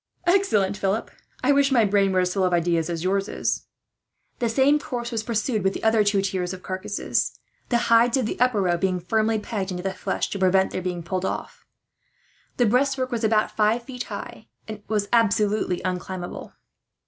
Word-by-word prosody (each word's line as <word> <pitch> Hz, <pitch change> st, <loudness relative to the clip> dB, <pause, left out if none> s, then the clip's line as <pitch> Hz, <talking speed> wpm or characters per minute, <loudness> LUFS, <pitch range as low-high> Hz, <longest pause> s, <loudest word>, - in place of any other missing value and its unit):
"Excellent, 345 Hz, -, +2 dB
Philip. 200 Hz, +2 st, -1 dB, 0.3 s
I 270 Hz, -, +4 dB
wish 280 Hz, 0 st, +3 dB
my 235 Hz, -4 st, +4 dB
brain 200 Hz, -1 st, +2 dB
was 185 Hz, -1 st, +2 dB
as -, -, -4 dB
full 195 Hz, -, 0 dB
of 180 Hz, -1 st, +1 dB
ideas 170 Hz, -1 st, +1 dB
as 165 Hz, -1 st, -3 dB
yours 195 Hz, +2 st, 0 dB
is." -, -, -2 dB, 0.7 s
The 235 Hz, -, 0 dB
same 275 Hz, +5 st, +3 dB
course 240 Hz, -4 st, -5 dB
was 225 Hz, -2 st, -1 dB
pursued 220 Hz, -1 st, -1 dB
with 190 Hz, 0 st, +1 dB
the -, -, -6 dB
other 220 Hz, -1 st, +4 dB
two 200 Hz, -1 st, +2 dB
tiers 185 Hz, -2 st, -2 dB
of 185 Hz, -, -14 dB
carcasses, 185 Hz, +2 st, -2 dB, 0.3 s
the 240 Hz, -, +3 dB, 0.2 s
hides 235 Hz, +2 st, +5 dB
of 255 Hz, -, 0 dB
the -, -, -4 dB
upper 245 Hz, -5 st, +2 dB
row 175 Hz, -1 st, +1 dB
being 185 Hz, 0 st, 0 dB
firmly 220 Hz, +5 st, +1 dB
pegged 210 Hz, -2 st, -4 dB
into 180 Hz, -1 st, -4 dB
the 190 Hz, 0 st, -2 dB
flesh, 190 Hz, -, -3 dB
to 200 Hz, -, -3 dB
prevent 190 Hz, 0 st, +3 dB
their 185 Hz, -, -3 dB
being 180 Hz, -1 st, -4 dB
pulled 185 Hz, +2 st, -3 dB
off. -, -, -5 dB, 0.9 s
The 245 Hz, -, +4 dB
breastwork 255 Hz, +3 st, +1 dB
was 235 Hz, -1 st, -2 dB
about 215 Hz, -1 st, +2 dB
five 220 Hz, +2 st, +2 dB
feet 250 Hz, 0 st, -6 dB
high, -, -, -8 dB, 0.2 s
and 215 Hz, -1 st, -7 dB
was 210 Hz, -1 st, 0 dB
absolutely 210 Hz, -4 st, +2 dB
unclimbable. 180 Hz, 0 st, -5 dB
205 Hz, 195 wpm, -24 LUFS, 185-235 Hz, 0.9 s, hides